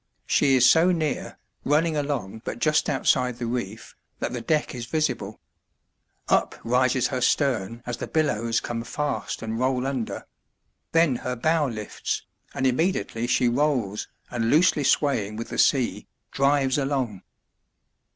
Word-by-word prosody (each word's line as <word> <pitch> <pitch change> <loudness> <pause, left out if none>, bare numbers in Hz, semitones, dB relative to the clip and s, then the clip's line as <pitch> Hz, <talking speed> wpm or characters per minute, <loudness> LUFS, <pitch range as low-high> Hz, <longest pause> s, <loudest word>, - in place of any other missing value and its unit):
She 135 -2 +3
is 125 -1 +6
so 170 +3 +5
near, 155 -5 -2 0.3
running 155 +3 +2
along 140 -8 -3
but - - -4
just 150 +5 +2
outside 125 -3 +1
the 120 - -4
reef, 115 -3 -5 0.2
that - - -3
the - - -3
deck 155 -2 0
is 120 -2 -6
visible. 130 -10 -2 0.9
Up - - +2
rises 125 +1 +2
her 130 -2 -2
stern 120 -6 0
as 120 -1 -4
the - - -5
billows 115 -7 0
come 115 -1 -4
fast 145 -1 -3
and 110 +1 -3
roll 130 0 +1
under; 130 -4 -3 0.7
then 165 -6 +3
her 125 +1 -4
bow 155 +4 +1
lifts, 110 -4 -4 0.3
and 135 - -1
immediately 130 -4 0
she 125 0 +2
rolls, 120 -5 0 0.2
and, 115 -2 -1
loosely 155 0 +4
swaying 120 -8 +1
with 115 +1 -6
the - - -4
sea, 130 -4 +2 0.2
drives 140 0 +2
along. 130 -8 -2
130 Hz, 145 wpm, -25 LUFS, 115-145 Hz, 0.9 s, is